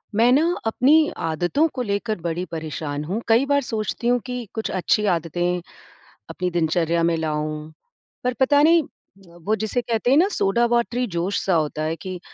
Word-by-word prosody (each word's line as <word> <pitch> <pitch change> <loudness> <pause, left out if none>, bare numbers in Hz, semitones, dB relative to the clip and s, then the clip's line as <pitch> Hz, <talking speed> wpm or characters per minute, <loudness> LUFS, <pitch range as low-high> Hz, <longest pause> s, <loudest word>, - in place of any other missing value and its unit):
मैं 235 +3 +4
ना 285 +5 +4 0.2
अपनी 255 +6 +4 0.3
आदतों 175 - +1
को 255 - -3
लेकर 215 0 -2
बड़ी 170 +1 -2
परेशान 155 -2 -4
हूँ। 190 +9 -3
कई 230 +4 +4
बार 285 0 +2
सोचती 225 0 -3
हूँ 245 0 +3
कि 250 -1 -4
कुछ 220 - -3
अच्छी 200 +3 +1
आदतें 175 +2 -1 0.7
अपनी 180 0 -2
दिनचर्या 170 0 +1
में 170 0 +2
लाऊँ। 155 0 -3 0.5
पर 250 0 0
पता 285 +2 +4
नहीं, 330 +2 +6
अ, 190 -9 -21
वो 210 +6 0
जिसे 230 +3 -1
कहते 235 +1 0
हैं 275 - +5
ना 355 +5 +5
सोडा 215 +5 +2
वाटरी 240 +1 0
जोश-सा 185 +2 0
होता 155 -1 -1
है 160 +1 -1
कि 185 +2 -7
195 Hz, 175 wpm, -22 LUFS, 165-245 Hz, 0.7 s, नहीं